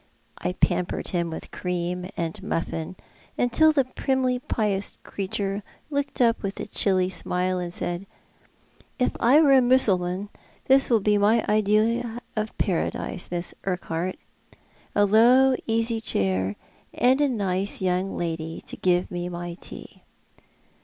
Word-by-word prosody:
I 180 - -2
pampered 180 -1 0
him 170 -2 -1
with 160 - -8
cream 180 0 -3
and 165 -2 -3
muffin, 165 +1 -3 0.4
until 310 +6 +4
the 280 -4 +2
primly 255 -1 0
pious 205 -5 -1
creature 195 +1 -3 0.3
looked 285 -1 -2
up 230 -2 +3
with 195 -1 -4
a - - -3
chilly 185 -2 +1
smile 180 0 -1
and 175 -1 -4
said, 175 +2 -4 0.9
"If 250 - +1
I 255 +6 +5
were 285 -3 +5
a 265 - +7
Mussulman 200 -6 +2 0.4
this 270 +1 +5
would 225 -5 +3
be 210 0 +3
my 215 +3 +3
idea 220 +3 +1 0.2
of 215 0 -3
Paradise, 180 -1 -1
Miss 175 0 -3
Urquhart. 180 -1 -2 0.8
A 205 - +5
low, 245 +6 +5
easy 225 0 +1
chair, 95 - 0 0.4
and 260 +3 +3
a 290 - +3
nice 200 -4 +1
young 185 +1 -1
lady 165 -1 -3
to - - -6
give 180 -1 +1
me 175 0 -3
my 175 0 -5
tea." 175 - -10
195 Hz, 140 wpm, -25 LUFS, 180-235 Hz, 0.9 s, a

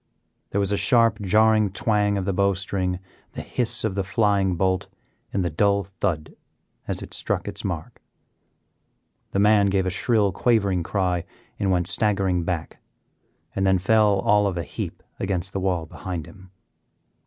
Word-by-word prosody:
There - - -3
was 100 0 +1
a 100 - +1
sharp, 115 +2 +3
jarring 110 +1 +4
twang 105 +1 +1
of 95 - -2
the 100 - 0
bow 100 +1 +2
string, 95 -1 -2 0.4
the - - -6
hiss 120 -1 -2
of 110 -3 0
the 100 0 -1
flying 100 -2 +1
bolt, 95 +1 0 0.4
and 95 -3 0
the 85 - -1
dull 100 +4 +2
thud 95 -5 -3 0.5
as - - -3
it - - -10
struck - - -2
its - - -5
mark. - - -5 1.3
The - - -3
man 105 0 +5
gave 95 -1 +1
a 95 - 0
shrill, 105 +1 +2
quavering 100 -4 +2
cry, 90 -1 -1 0.4
and 100 - 0
went 90 -2 +2
staggering 95 -1 +1
back, 85 -2 -4 0.8
and 95 - 0
then 95 0 +4
fell 105 +2 +3
all 105 0 +3
of 95 -3 -2
a 85 - -2
heap - - -6 0.2
against 95 -1 -2
the 100 - -1
wall 90 -3 0
behind 85 0 -6
him. 95 -2 -15
95 Hz, 165 wpm, -24 LUFS, 90-105 Hz, 1.3 s, man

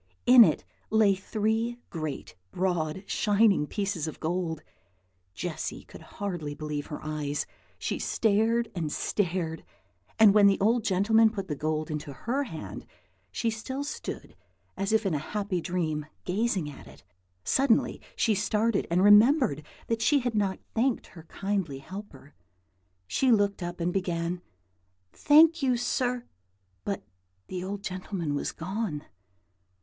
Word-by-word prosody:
In 245 -1 +10
it - - +2 0.3
lay 215 -2 +4
three 220 +4 -1
great, 155 -5 -5 0.2
broad, 175 -1 -1
shining 205 -7 +3
pieces 195 -5 -2
of 155 - -7
gold! 165 -1 -2 0.7
Jessy - - -4
could - - -13
hardly 175 -8 -5
believe 150 -1 -4
her 150 - -6
eyes. 150 -1 -2 0.3
She - - -3
stared 225 +2 +1
and 160 -4 -3
stared; 170 -4 -1 0.5
and 215 -2 +7
when 205 -1 +7
the 195 - +3
old 225 +3 +3
gentleman 220 +4 +4
put 200 -3 -5
the 150 - -2
gold 155 +2 -2
into 150 -2 -5
her 260 - -2
hand, 120 - -8 0.4
she 230 - -1
still 260 +5 -4
stood 290 - -6 0.4
as 195 +1 -2
if 220 -1 +2
in 190 - +1
a 150 - 0
happy 200 +2 -2
dream, 160 -4 -2 0.2
gazing 195 -3 0
at 145 - -10
it. - - -15 0.4
Suddenly 265 - +2
she 225 - +2
started, 210 +1 +1
and 175 +2 +2
remembered 205 - +6 0.2
that 230 -1 -1
she 285 +3 +4
had 245 -1 -1
not 200 -3 0 0.2
thanked 240 +2 +1
her 165 -3 -12
kindly 195 -6 -2
helper. 145 -2 -10 0.7
She 250 - +2
looked 205 -3 +2
up, 175 0 -5
and 175 +1 0
began, 175 -2 -1 0.7
"Thank 320 +2 +5
you, 255 -3 +2
sir;" 245 0 -1 0.6
but 200 - -3 0.5
the 180 -1 -4
old 200 +1 -5
gentleman 185 -4 -3
was 145 - -2
gone. 185 -3 -4
195 Hz, 140 wpm, -28 LUFS, 160-220 Hz, 0.7 s, In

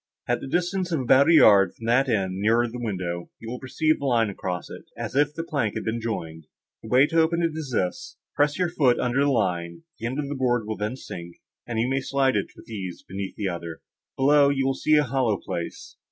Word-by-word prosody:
At 120 - 0
the - - -6
distance 180 +4 -1
of 160 - +1
about 135 +4 +5
a - - +6
yard 100 -10 +6
from 115 - -10
that 125 +4 +3
end, 95 -4 0
nearer 115 +3 +3
the 120 +2 -7
window, 90 -6 -4
you 115 - -10
will 125 - -5
perceive 155 +4 0
a - - -3
line 115 -4 +2
across 90 -2 -4
it, - - -10
as - - -5
if 145 +1 +2
the 165 - -3
plank 140 -11 -2
had - - -3
been 115 +1 -2
joined;—the 80 -1 -7
way 130 +4 +6
to 165 +2 +2
open 170 +1 +1
it 165 - +1
is 155 -4 -5
this:—Press 145 +8 -2
your 180 -2 +1
foot 135 -7 +3
upon 125 - -1
the 140 +2 +3
line; 85 -9 -1 0.2
the 115 - -3
end 130 +3 -4
of 150 -1 -2
the 145 - -3
board 120 -4 0
will 110 0 -3
then 105 +4 -3
sink, 85 -9 -9 0.3
and 120 -2 -3
you 115 - +1
may 135 +1 0
slide 135 -1 +1
it - - 0
with - - -15
ease 95 -6 -6
beneath 95 0 -5
the 105 -3 -2
other. 85 -2 -5 0.4
Below, 140 +1 +5
you 135 -1 0
will 135 - +2
see 155 +3 +2
a 150 - +5
hollow 125 -5 0
place." 85 -2 -6
120 Hz, 235 wpm, -25 LUFS, 100-140 Hz, 0.4 s, a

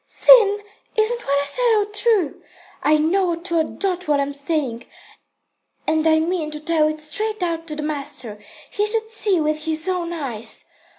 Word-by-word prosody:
"Sin? 415 -4 +5 0.3
Isn't 460 +2 +1
what 280 0 +2
I - - -5
said 465 +9 +2
all 415 - +2
true? 420 -5 0 0.4
I 305 +1 +3
know 345 +3 +1
to 335 0 -2
a - - +3
dot 365 +1 -3
what 295 -1 +2
I'm 280 0 -1
saying, 280 -5 -3 1.0
and 315 0 +1
I 315 0 +4
mean 325 -1 -1
to 300 0 -7
tell 310 0 +2
it 310 0 -3
straight 420 +7 -2
out 330 -1 -3
to 305 - -5
the 300 - -5
master. 280 -7 -4 0.3
He 415 +1 0
should 445 0 -1
see 410 -5 +2
with 305 0 -1
his 320 +1 0
own 360 -2 -2
eyes. 265 -10 -2
325 Hz, 180 wpm, -21 LUFS, 300-400 Hz, 1.0 s, Sin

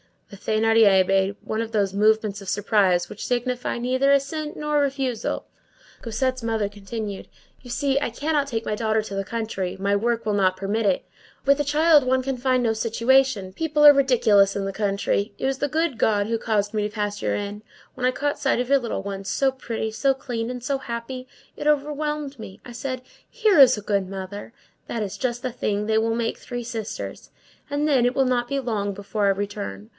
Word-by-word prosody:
The 200 - -10
Thénardier 215 -2 +4
made 195 +1 +1
one 220 +1 -2
of 225 0 -5
those 200 -3 +1
movements 215 0 +2
of 195 - -11
surprise 190 -3 +2
which 210 - -6
signify 250 0 -1
neither 260 +3 +2
assent 300 +2 -1
nor 300 0 0
refusal. 270 -5 -1 0.6
Cosette's 255 +3 -1
mother 225 -3 -1
continued:— 205 0 -6 0.3
"You 245 - -13
see, 275 +2 +1
I 285 - -1
cannot 290 +4 -1
take 230 -4 -3
my - - -1
daughter 220 0 +1
to 205 - -8
the 195 0 -2
country. 220 -4 -3
My 200 +1 0
work 230 +2 0
will 210 - 0
not 190 -2 +2
permit 205 +4 -1
it. 195 -2 +2 0.4
With 280 +1 +4
a 290 - +1
child 300 0 +4
one 260 0 +2
can 270 0 -2
find 255 0 +1
no 230 - +2
situation. 230 -1 +2
People 300 - +2
are 295 - +12
ridiculous 225 -8 +4
in 200 - -1
the 195 - -2
country. 200 0 -1
It - - -3
was 265 0 0
the 285 - 0
good 315 -2 0
God 205 -2 +2
who 230 0 0
caused 210 -2 -1
me 210 -1 0
to 210 - -13
pass 205 -1 -2
your - - 0
inn. 205 0 -4 0.3
When 255 - -3
I 255 - +4
caught 285 +2 -2
sight 270 -3 +1
of 250 - -4
your 280 0 +5
little 235 -5 -4
ones, 195 -1 -5
so 270 +6 +2
pretty, 230 -4 -4
so 270 +5 +2
clean, 240 -3 -4
and 250 -1 -6
so 275 +2 0
happy, 255 +1 -6 0.3
it 295 - -3
overwhelmed 295 -1 -1
me. 195 -1 -10
I 245 - -9
said: 255 +1 -4 0.3
'Here 430 -8 +3
is 265 -5 +8
a - - -5
good 200 -2 0
mother. 195 +3 -7 0.3
That 225 - -2
is 195 - -5
just 240 -1 -2
the 255 - -2
thing; 210 -3 -2
that 220 0 +3
will 225 0 0
make 230 -1 -1
three 245 -1 -6
sisters.' 225 -2 -6 0.4
And 290 +1 0
then, 270 -5 +3
it 245 +1 +1
will 270 - +3
not 245 -1 +1
be 275 +2 -1
long 205 -5 -2
before 200 +1 -2
I - - +5
return. 195 - -5
230 Hz, 210 wpm, -24 LUFS, 205-265 Hz, 0.6 s, are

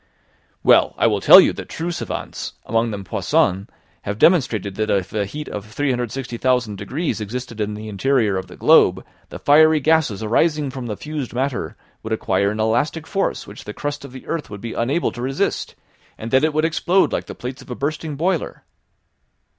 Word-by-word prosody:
"Well, - - +5
I - - +2
will - - +2
tell - - +10
you - - +4
that - - -8
true 170 +2 -3
savants, - - -5
amongst 115 +1 +1
them 100 -3 -5
Poisson, 95 +1 0 0.3
have 105 +1 -4
demonstrated 120 - +3
that 110 +2 -2
if 95 -2 0
a 105 -2 -1
heat 150 +8 -7
of 105 - -5
360,000 125 -2 -1
degrees 110 - -3
existed 115 +1 -5
in 105 0 -2
the 110 +1 -7
interior 110 0 +1
of 95 - -3
the - - -12
globe, - - +4 0.2
the - - -7
fiery 155 +2 +5
gases 150 -8 +1
arising 150 +5 +1
from 130 -2 -6
the 105 -3 -4
fused 150 -6 -5
matter 130 0 -2 0.3
would - - -3
acquire 100 0 +1
an 105 +1 -4
elastic 120 +9 0
force 195 +3 -2
which 100 - -11
the 105 - -7
crust 145 -1 -4
of 140 - -10
the 130 0 -11
earth 165 -2 -4
would 105 - -8
be 115 - -5
unable 135 +9 0
to 120 - -8
resist, 135 +2 -2 0.4
and 115 +1 -7
that 130 +2 +4
it 155 - +3
would 155 +1 +1
explode 175 +3 +2
like - - -2
the - - -8
plates 125 +1 -7
of - - -15
a 125 - -4
bursting 150 +2 -3
boiler." 170 +3 -2
125 Hz, 195 wpm, -21 LUFS, 105-150 Hz, 0.4 s, tell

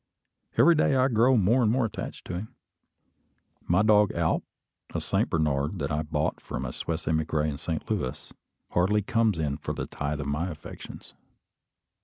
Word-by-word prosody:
Every 145 +9 +7
day 150 -3 +3
I 130 +1 +4
grow 120 +2 +4
more 110 +6 +4
and 110 -3 +3
more 125 0 +2
attached 110 - -6
to - - -5
him. 95 +5 -6 1.1
My 90 +4 +4
dog 105 -2 +5
Alp, 85 -1 +1 0.5
a - - +1
Saint - - 0
Bernard 75 +1 0
that 70 -4 -2
I 75 +1 0
bought 75 0 -2
from 65 - -5
a 60 - -5
Swiss 85 0 -4
emigre 80 -1 +1
in 70 -2 -3
Saint - - -4
Louis, 65 - -3 0.4
hardly 100 +4 +2
comes 115 -4 +2
in 75 -3 -1
for - - -4
a - - -2
tithe 75 +1 -3
of - - -5
my 75 +6 -1
affections. 75 -3 -10
85 Hz, 175 wpm, -27 LUFS, 75-110 Hz, 1.1 s, Every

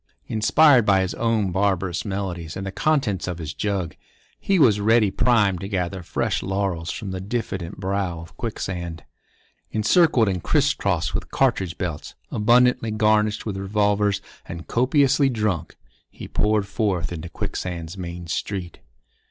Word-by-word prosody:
Inspired 125 +4 +5
by 95 -2 +4
his 95 - -2
own 115 -5 0
barbarous 95 -2 0
melodies 95 -4 -4
and 95 - -5
the 95 - -4
contents 135 -7 0
of 90 -2 -3
his 80 -3 -5
jug, 100 -5 -2 0.4
he 195 - +1
was 115 - +5
ready 110 -1 +3
primed 105 -7 +2
to 95 - -4
gather 95 -2 -2
fresh 85 - -1
laurels 95 -4 -2
from 105 -4 -5
the 95 0 -4
diffident 95 -5 -4
brow 95 -3 -2
of 80 0 -12
Quicksand. 90 -7 -5 0.7
Encircled 115 - +3
and 95 -3 -1
criss - - +2
crossed - - -1
with - - -3
cartridge 95 -10 0
belts, 85 -5 -5 0.2
abundantly 120 +1 +3
garnished 105 0 +2
with 100 -3 -3
revolvers, 100 0 +1 0.2
and 85 0 -7
copiously 135 +2 +3
drunk, 105 -9 -2 0.3
he - - -10
poured 105 -1 +1
forth 100 -6 -1
into 85 0 -6
Quicksand's 85 -1 -5
main 90 -2 -6
street. 90 +1 -4
100 Hz, 145 wpm, -23 LUFS, 90-110 Hz, 0.7 s, Inspired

